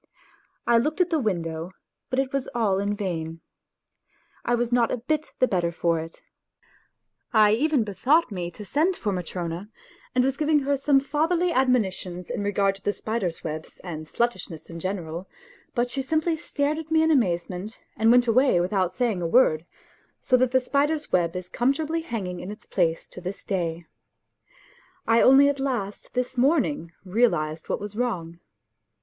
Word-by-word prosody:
I 235 -1 +5
looked 300 +8 -1
at 360 -1 +2
the 320 - +2
win 200 - 0
dow, 165 +2 -5 0.4
but 255 - -2
it 270 0 0
was 275 -2 -1
all 205 -5 +2
in 205 +1 -1
vain... 165 -5 -4 1.0
I 240 - +2
was 240 0 -1
not 240 -2 +3
a - - -1
bit 305 +6 -2
the 255 - +3
better 175 -5 0
for 170 -1 0
it! 165 +1 -9 1.1
I 215 -2 +6
even 275 +3 +2
bethought 250 - +2
me 180 -3 -3
to 205 +4 -10
send 320 - +1
for 210 - -1
Matrona, 180 +1 -4 0.5
and 250 - +4
was 270 +1 0
giving 305 0 +3
her 280 +1 +1
some 275 0 +3
fatherly 330 +5 +1
admonitions 195 - 0
in - - -2
regard 200 -1 +1
to - - -21
the 205 - 0
spider's 200 -8 -3
web 155 0 -4 0.2
and 155 -4 -6
sluttishness 210 -7 -3
in 165 - -7
general; 180 -1 -4 0.5
but 240 0 0
she 270 - -1
simply 315 +4 0
stared 300 0 -1
at 320 -1 -8
me 320 0 +4
in 320 - +3
amaze 185 - +2
ment 190 +4 -7 0.2
and 225 +1 +3
went 245 +1 +6
away 245 -4 +4
without 185 0 +1
saying 220 -3 -1
a 170 - 0
word, 165 -6 +3 0.5
so 255 - +2
that 255 0 +3
the 260 +1 +3
spider's 295 +4 0
web 170 -1 +2
is 180 -1 -4
comfortably 305 - 0
hanging 200 - -4
in 180 - -7
its 210 +1 -9
place 165 -3 0
to 180 - -10
this 185 +2 -6
day. 170 -3 -2 1.2
I 230 0 +5
only 270 +2 +7
at 285 -1 0
last 240 -7 -3
this 250 0 -1
morning 275 - +2
realized 175 -7 +1
what - - 0
was 205 0 -7
wrong. 175 -9 -2
220 Hz, 180 wpm, -25 LUFS, 180-270 Hz, 1.2 s, only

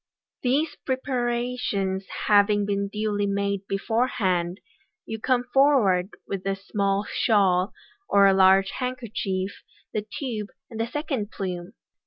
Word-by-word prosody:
These 290 +5 +1
preparations 240 -7 -1 0.2
having 205 0 +4
been 200 0 -1
duly 210 0 -1
made 200 0 -1
beforehand, 195 -4 0 0.5
you 220 0 -5
come 250 +1 +1
forward 225 -10 +4 0.2
with 195 -2 -4
a 195 - +1
small 200 0 -1
shawl, 195 -4 +2 0.4
or 200 -1 +6
large 190 0 +5
handkerchief, 220 -7 -3 0.3
the 215 - -1
tube, 225 -7 -3 0.2
and 225 - -7
the 225 - 0
second 260 -5 -3
plume. 180 -1 -5
205 Hz, 115 wpm, -25 LUFS, 195-240 Hz, 0.5 s, or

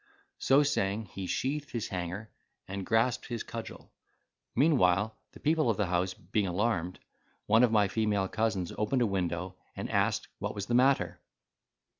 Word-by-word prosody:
So 135 +2 +5
saying, 105 -6 0
he 95 -1 -5
sheathed 145 +6 -2
his 115 -3 -2
hanger, 90 +4 -4 0.4
and 95 0 -5
grasped 115 +2 +2
his 120 -3 -3
cudgel. - - -8 0.6
Meanwhile 110 - +3 0.2
the - - -13
people 155 -3 +2
of 110 - +1
the 105 - +1
house 90 +1 0
being 95 +3 -1
alarmed, 90 -2 0 0.5
one 110 +2 +5
of 120 - +4
my 105 -2 +4
female 105 -2 0
cousins 110 -5 -1
opened 120 +4 +2
a - - +3
window, 90 -2 -2 0.2
and - - -5
asked - - +1
what - - -3
was 100 -1 -3
the 120 - -3
matter. 120 -9 +3
105 Hz, 160 wpm, -30 LUFS, 95-120 Hz, 0.6 s, So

